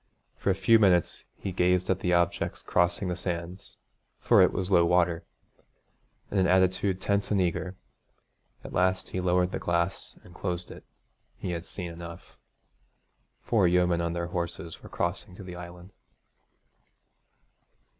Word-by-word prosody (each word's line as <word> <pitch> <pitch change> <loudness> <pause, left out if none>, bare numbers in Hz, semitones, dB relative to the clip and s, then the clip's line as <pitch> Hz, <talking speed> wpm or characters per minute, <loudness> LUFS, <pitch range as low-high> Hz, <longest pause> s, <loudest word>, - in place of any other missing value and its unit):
For - - -2
a 95 - +3
few 105 +4 +5
minutes 90 -5 +2
he 95 - -4
gazed 90 0 +2
at 95 - +1
the 90 - 0
objects 85 -1 0
crossing 90 +2 +1
the 90 - -1
sands 90 +2 -5 0.4
for - - +5
it - - +5
was 95 +1 -3
low 85 -2 +6
water 85 -1 +2 1.1
in 100 - +1
an 95 - +3
attitude 95 +1 +2
tense 100 +1 0
and 105 - +2
eager. 90 +1 -1 0.9
At - - -9
last 95 +1 +1
he 95 - -3
lowered 90 0 +2
the - - -3
glass 85 +2 -1
and 90 - -15
closed 90 -1 -4
it. - - -11 0.5
He 90 - -4
had 85 0 -4
seen 90 -4 -6
enough. 85 0 -10 1.1
Four 105 -6 +3
yeomen 90 -1 +3
on 85 0 -1
their 85 0 -3
horses 85 -1 -4
were - - -12
crossing 85 +1 -3
to 100 - -10
the 90 -1 -8
island. 90 +1 -10
90 Hz, 155 wpm, -28 LUFS, 85-95 Hz, 1.1 s, low